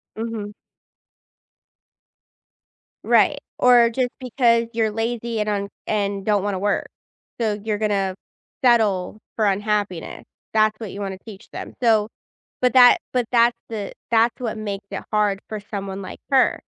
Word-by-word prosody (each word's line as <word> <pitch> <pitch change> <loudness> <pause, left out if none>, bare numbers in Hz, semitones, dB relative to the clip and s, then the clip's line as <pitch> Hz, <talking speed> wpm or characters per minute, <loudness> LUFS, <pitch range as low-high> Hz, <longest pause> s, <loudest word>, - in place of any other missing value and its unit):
Mhm. 220 -2 -5 2.5
Right, - - +4 0.2
or 245 -2 +6
just 245 +2 0
because 235 -2 +2
you're 225 -1 +1
lazy 230 +1 -2
and 210 - -1
un 200 -1 -2 0.2
and 200 -2 -1
don't 210 -2 +2
wanna 200 -2 -1
work, 205 +1 0 0.5
so 215 -3 0
you're 215 0 -1
gonna 200 -3 0 0.5
settle 215 -6 +3 0.2
for 220 - +1
unhappiness. 205 -3 -1 0.3
That's 215 0 +3
what 220 -5 -6
you 200 - -6
wanna 195 -1 -4
teach 210 -4 -12
them. - - -7
So, 220 -3 +4 0.5
but 250 0 +3
that 245 -1 +8
but 250 -2 +1
that's 235 0 +4
the 210 -3 -4 0.2
that's 230 0 +3
what 230 -3 -3
makes 200 -2 -5
it 195 - -5
hard 210 -2 +1
for 215 - -4
someone 200 -1 -6
like 185 - -8
her, 265 -1 +3
215 Hz, 145 wpm, -22 LUFS, 200-230 Hz, 2.5 s, that